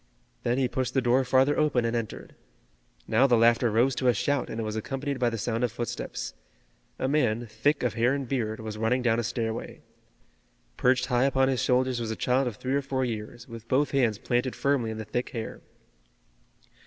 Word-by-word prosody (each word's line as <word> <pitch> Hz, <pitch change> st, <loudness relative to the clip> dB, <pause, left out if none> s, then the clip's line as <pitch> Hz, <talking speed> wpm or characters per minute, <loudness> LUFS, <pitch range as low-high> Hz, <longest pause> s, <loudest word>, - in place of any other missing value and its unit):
Then 120 Hz, +1 st, 0 dB
he 135 Hz, -2 st, +2 dB
pushed 130 Hz, +1 st, -3 dB
the -, -, +5 dB
door 125 Hz, +2 st, +3 dB
farther 130 Hz, +3 st, +3 dB
open 135 Hz, -6 st, +2 dB
and 115 Hz, +1 st, 0 dB
entered. 115 Hz, -3 st, -5 dB, 0.7 s
Now 115 Hz, +5 st, +4 dB
the 120 Hz, -3 st, +4 dB
laughter 115 Hz, +1 st, +4 dB
rose 120 Hz, +5 st, +3 dB
to 130 Hz, -, 0 dB
a 120 Hz, -, +4 dB
shout, 140 Hz, +5 st, 0 dB
and 110 Hz, -, -5 dB
it -, -, -1 dB
was 110 Hz, 0 st, -3 dB
accompanied 135 Hz, +4 st, -3 dB
by 120 Hz, -1 st, +2 dB
the 115 Hz, -, -4 dB
sound 115 Hz, +2 st, -2 dB
of 120 Hz, -, +1 dB
footsteps. 120 Hz, 0 st, -5 dB, 0.6 s
A 130 Hz, -, -1 dB
man, 120 Hz, -5 st, +1 dB
thick 120 Hz, +7 st, 0 dB
of 120 Hz, -4 st, +1 dB
hair 120 Hz, +4 st, +2 dB
and 140 Hz, -2 st, -4 dB
beard, 110 Hz, -4 st, -2 dB
was 110 Hz, -1 st, -6 dB
running 125 Hz, +3 st, +1 dB
down 115 Hz, -1 st, +2 dB
a -, -, -1 dB
stairway. 115 Hz, -1 st, -4 dB, 0.9 s
Perched 125 Hz, 0 st, +2 dB
high 125 Hz, 0 st, +2 dB
upon 135 Hz, -1 st, +3 dB
his 130 Hz, -1 st, 0 dB
shoulders 130 Hz, -1 st, +2 dB
was 115 Hz, -2 st, -3 dB
a 110 Hz, -, -2 dB
child 130 Hz, +3 st, +1 dB
of 120 Hz, -, -3 dB
three 130 Hz, +5 st, -3 dB
or 140 Hz, -, +2 dB
four 130 Hz, -1 st, -1 dB
years, 110 Hz, 0 st, -6 dB
with 115 Hz, 0 st, -10 dB
both 140 Hz, +4 st, +2 dB
hands 120 Hz, -7 st, +2 dB
planted 125 Hz, +3 st, -1 dB
firmly 140 Hz, -5 st, +1 dB
in 110 Hz, -, -5 dB
the 110 Hz, -, -5 dB
thick 120 Hz, +4 st, -3 dB
hair. 115 Hz, -2 st, -5 dB
125 Hz, 210 wpm, -27 LUFS, 115-130 Hz, 0.9 s, the